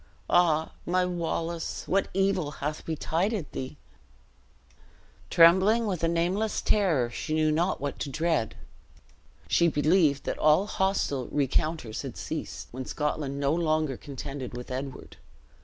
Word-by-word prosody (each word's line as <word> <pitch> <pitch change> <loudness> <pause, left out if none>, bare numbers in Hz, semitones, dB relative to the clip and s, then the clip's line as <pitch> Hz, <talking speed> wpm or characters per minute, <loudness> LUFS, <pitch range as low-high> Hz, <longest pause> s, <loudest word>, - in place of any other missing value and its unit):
Ah, 160 -3 +3
my 180 +1 +1
Wallace, 170 -1 -3
what 195 +1 +2
evil 195 -5 +1
hath 150 +2 -4
betided 165 +3 -1
thee?" 130 - -6 1.5
Trembling 190 +7 +6
with 185 -6 -2
a - - +4
nameless 180 +6 0
terror, 160 - +2
she 155 +6 -3
knew 155 -1 +3
not 170 +5 +1
what 145 0 -4
to - - -3
dread. 155 -4 0 0.9
She 170 - +4
believed 150 -2 +3
that - - -3
all 155 +6 +4
hostile 190 - 0
recounters 145 -3 -1
had - - -7
ceased, - - -5
when 130 +1 -6
Scotland 150 -2 -2
no 140 +1 +2
longer 155 -4 +1
contended 135 -1 -7
with 125 +1 -8
Edward. 135 +1 -6
160 Hz, 130 wpm, -28 LUFS, 140-180 Hz, 1.5 s, Trembling